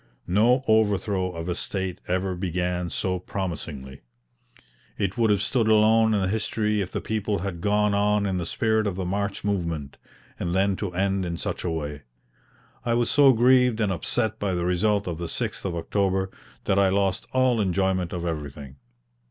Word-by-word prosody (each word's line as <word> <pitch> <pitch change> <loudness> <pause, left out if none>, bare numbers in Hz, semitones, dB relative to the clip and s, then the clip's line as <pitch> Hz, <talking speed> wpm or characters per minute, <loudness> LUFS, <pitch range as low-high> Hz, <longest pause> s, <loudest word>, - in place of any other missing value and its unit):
No 115 +8 +3
overthrow 100 -3 +2
of 85 0 -6
a 90 - 0
state 95 0 -3
ever 95 +1 0
began 90 -1 -2
so 90 +1 -2
promisingly. 80 -8 -5 1.0
It 100 -1 -1
would 115 -2 +2
have 105 -1 +2
stood 115 0 +1
alone 110 0 +4
in 95 -2 +1
history 105 0 0
if 95 - -4
the - - -3
people 105 -1 -1
had 85 -4 -4
gone 105 +1 +2
on 105 0 +2
in 95 -2 -1
the 85 - -3
spirit 110 +1 +1
of 100 - -2
the 95 -1 -3
March 100 +2 -2
movement; 85 -8 -2 0.4
and 85 +1 -2
then 95 +1 +2
to 100 -4 -3
end 95 +1 +1
in 85 -1 -3
such - - -3
a 90 - -1
way! 75 -3 -4 0.8
I 120 -1 +1
was 120 0 +1
so 140 -2 +6
grieved 125 -1 +4
and 105 -3 +1
upset 110 +5 0
by 100 -3 -1
the 85 0 -1
result 100 +3 +1
of 85 -2 -4
the 85 - -3
6th - - -3
of 90 -3 -2
October, 95 +2 0 0.3
that 95 - +2
I 100 -1 +4
lost 100 +3 0
all 130 -3 +2
enjoyment 95 -2 0
of 85 -1 -4
everything. 70 -4 -5
95 Hz, 180 wpm, -25 LUFS, 90-105 Hz, 1.0 s, so